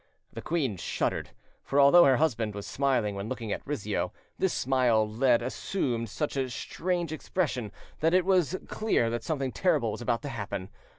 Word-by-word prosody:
The - - -6
queen 140 - -1
shuddered; - - -2 0.3
for 140 - +1
although 145 +5 +8
her 130 -2 +5
husband 115 -9 0
was 100 - -6
smiling 130 -7 0
when 100 +2 -5
looking 120 -4 -4
at - - -2
Rizzio, 105 -9 -2 0.3
this 190 - +2
smile 125 -4 +2
lead 120 +2 +2
assumed 120 - -2
such 150 +7 -3
a 135 -2 -1
strange 175 +6 -2
expression 145 - -2 0.3
that 165 +3 +3
it 185 -1 +3
was 185 -2 +2
clear 215 - +1
that 120 -1 -3
something 140 -5 -2
terrible 150 - +1
was - - -6
about 120 +1 -1
to 145 - -4
happen. 100 -6 -5
130 Hz, 175 wpm, -28 LUFS, 115-160 Hz, 0.3 s, although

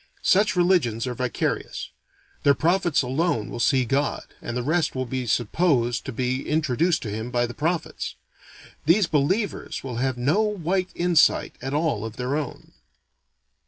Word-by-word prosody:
Such 195 0 +3
religions 175 - +2
are 125 - -2
vicarious; 125 0 -3 0.5
their 140 -1 +4
prophets 175 -1 +2
alone 130 - 0
will - - -5
see 130 +1 +3
God, 140 +4 0 0.2
and 120 - -4
the 125 - -2
rest 160 +3 +1
will 130 0 -1
be 125 0 -3
supposed 120 - +1
to - - -2
be 130 +2 -1
introduced 155 +2 +1
to 110 - -4
him 110 +3 -4
by 120 -1 +1
the 120 - -6
prophets. 165 +6 -2 0.7
These 185 +5 +5
"believers" 175 +8 -1
will 125 -3 -5
have 130 0 0
no 145 - +2
white 190 -3 0
insight 175 -2 +3
at 135 +3 -3
all 150 -9 0
of 110 0 -6
their 125 +3 -2
own. 150 -2 -5
140 Hz, 160 wpm, -24 LUFS, 125-170 Hz, 0.7 s, These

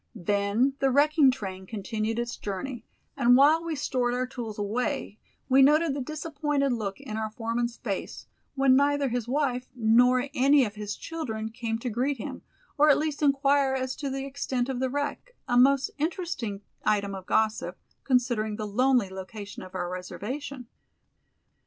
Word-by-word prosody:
Then 205 +6 +1
the 270 - +3
wrecking 290 +1 +5
train 190 -7 -4
continued 220 +2 -3
its 240 0 -2
journey, 225 +4 -5 0.3
and 245 -2 +5
while 305 +4 +5
we 330 -2 -3
stored 250 -3 0
our 255 +1 0
tools 240 -4 -6
away 220 +2 -2 0.3
we 265 +1 +5
noted 300 +2 +5
the 280 - -3
disappointed 295 -1 -1
look 205 -4 -3
in 265 -6 -6
our 220 0 -2
foreman's 230 +1 -2
face 200 -5 -5 0.3
when 270 -1 +5
neither 285 0 +2
his 240 -1 -2
wife 255 -2 0
nor 250 +3 +4
any 275 +1 +5
of 210 - -5
his 210 -1 -5
children 220 -10 -5
came 225 0 -3
to 245 +2 -4
greet 260 +5 0
him, 220 - -6 0.4
or 300 +1 +6
at 285 - +6
least 305 -1 -2
inquire 275 -1 +3
as 260 0 -2
to 285 -2 -3
the 270 0 -3
extent 265 -2 -2
of 260 -2 -2
the 260 0 0
wreck, 290 - -4
a 245 - 0
most 270 +2 +4
interesting 305 - -3 0.2
item 200 -2 +1
of 190 0 -8
gossip, 220 0 0 0.3
considering 240 -5 +1
the 215 - -4
lonely 240 -1 +2
location 200 +2 -8
of 185 0 -11
our 175 -1 -2
reservation. 245 +9 -6
250 Hz, 165 wpm, -27 LUFS, 220-280 Hz, 0.4 s, or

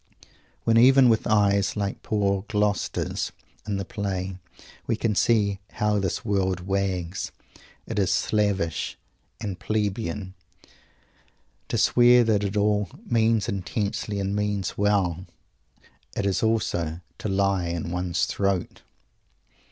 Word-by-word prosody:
When, 115 0 +3
even 130 +1 +7
with 110 -1 +2
eyes 100 -1 +2
like 100 -1 -2
poor 100 -3 0
Gloucester's 105 -2 -1 0.4
in 100 -2 -1
the 95 - -3
play, 95 -3 -3 0.5
we - - +1
can 110 0 0
see 100 -2 +2
"how 105 -2 +1
this 95 +4 -2
world 95 -3 0
wags," 95 -1 -2 0.5
it - - -3
is 95 - +2
slavish 100 -7 0 0.4
and 100 -3 -5
"plebeian" 105 -2 -2 1.3
to - - -1
swear 120 0 +6
that 110 -3 +2
it 100 +1 -2
all 105 -2 +2 0.2
"means 115 -2 +2
intensely, 100 0 -2
and 100 +1 -1
means 105 -2 -1
well." 95 -4 +1 0.9
It 100 - 0
is 100 -2 +1
also 90 -7 0 0.2
to 110 - -3
lie 95 -2 +1
in 85 0 -3
one's 90 0 0
throat! 100 -3 -1
100 Hz, 120 wpm, -25 LUFS, 95-105 Hz, 1.3 s, even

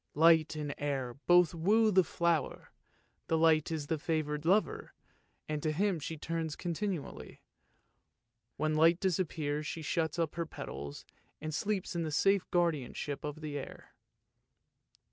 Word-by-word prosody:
Light 160 0 +5
and 150 -2 -3
air 135 -4 -2
both 175 -2 +6
woo 215 +7 +3
the 190 -1 +5
flower, 170 -1 -1 0.6
but 160 - +2
light 160 -1 +4
is 160 -3 -3
the 160 0 -2
favoured 155 -1 -2
lover, 215 - +1 0.5
and 150 -1 -2
to 155 - 0
him 185 +2 +1
she 160 +2 -5
turns 160 0 -3
con 175 - -3
tinually; 185 -4 -4 1.2
when 155 0 0
light 165 +3 +5
disappears 155 -5 -1
she 160 - -5
shuts 160 +1 -1
up 165 -3 0
her 170 -1 -3
petals 70 - -7 0.3
and 155 +1 -5
sleeps 195 +2 -2
in 170 - 0
the 160 - -2
safe 195 +4 +2
guardianship 150 -5 -1
of 150 +1 -6
air. 145 -2 -7
160 Hz, 145 wpm, -32 LUFS, 150-175 Hz, 1.2 s, both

